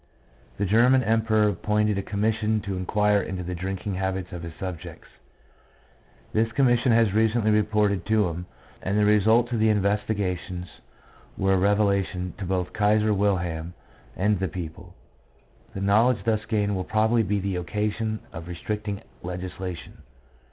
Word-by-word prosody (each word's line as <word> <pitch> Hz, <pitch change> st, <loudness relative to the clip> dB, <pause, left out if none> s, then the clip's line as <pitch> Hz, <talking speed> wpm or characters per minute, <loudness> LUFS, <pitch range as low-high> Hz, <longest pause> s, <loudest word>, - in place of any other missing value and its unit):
The -, -, 0 dB
German 120 Hz, +6 st, +4 dB
Emperor 110 Hz, -1 st, +2 dB
appointed 105 Hz, +1 st, +1 dB
a 100 Hz, -, -1 dB
commission 110 Hz, +2 st, 0 dB
to 100 Hz, -1 st, -4 dB
inquire 105 Hz, +2 st, +2 dB
into 95 Hz, -1 st, -5 dB
the 90 Hz, +1 st, -4 dB
drinking 95 Hz, +3 st, -4 dB
habits 95 Hz, 0 st, -3 dB
of 85 Hz, -, -6 dB
his 85 Hz, -1 st, -8 dB
subjects. 90 Hz, -3 st, -7 dB, 1.3 s
This 115 Hz, +1 st, +1 dB
commission 125 Hz, -2 st, +3 dB
has 115 Hz, -3 st, +3 dB
recently 110 Hz, 0 st, +2 dB
reported 105 Hz, -2 st, +2 dB
to 110 Hz, -3 st, +3 dB
him, 85 Hz, +1 st, -5 dB, 0.3 s
and 100 Hz, +3 st, -1 dB
the 105 Hz, -, +4 dB
results 110 Hz, +3 st, +4 dB
of 115 Hz, -, 0 dB
the 110 Hz, 0 st, +4 dB
investigations 100 Hz, -3 st, -1 dB, 0.7 s
were 95 Hz, 0 st, +2 dB
a -, -, +3 dB
revelation 100 Hz, -2 st, +1 dB
to 100 Hz, -, -4 dB
both 90 Hz, -1 st, -2 dB
Kaiser 105 Hz, +1 st, +3 dB
Wilhelm 90 Hz, -4 st, -1 dB, 0.4 s
and 100 Hz, 0 st, +1 dB
the 95 Hz, -, 0 dB
people. 80 Hz, -2 st, -8 dB, 0.8 s
The 95 Hz, -, -4 dB
know 105 Hz, +4 st, +4 dB
ledge 115 Hz, -7 st, 0 dB
thus 110 Hz, -1 st, 0 dB
gained 105 Hz, -2 st, 0 dB
will 95 Hz, -, -2 dB
probably 110 Hz, +3 st, +2 dB
be 105 Hz, 0 st, 0 dB
the 95 Hz, -1 st, -2 dB
occasion 105 Hz, +4 st, -2 dB
of 80 Hz, +1 st, -8 dB
restricting 105 Hz, +4 st, -4 dB, 0.2 s
legislation. 90 Hz, 0 st, -6 dB
100 Hz, 150 wpm, -25 LUFS, 95-110 Hz, 1.3 s, German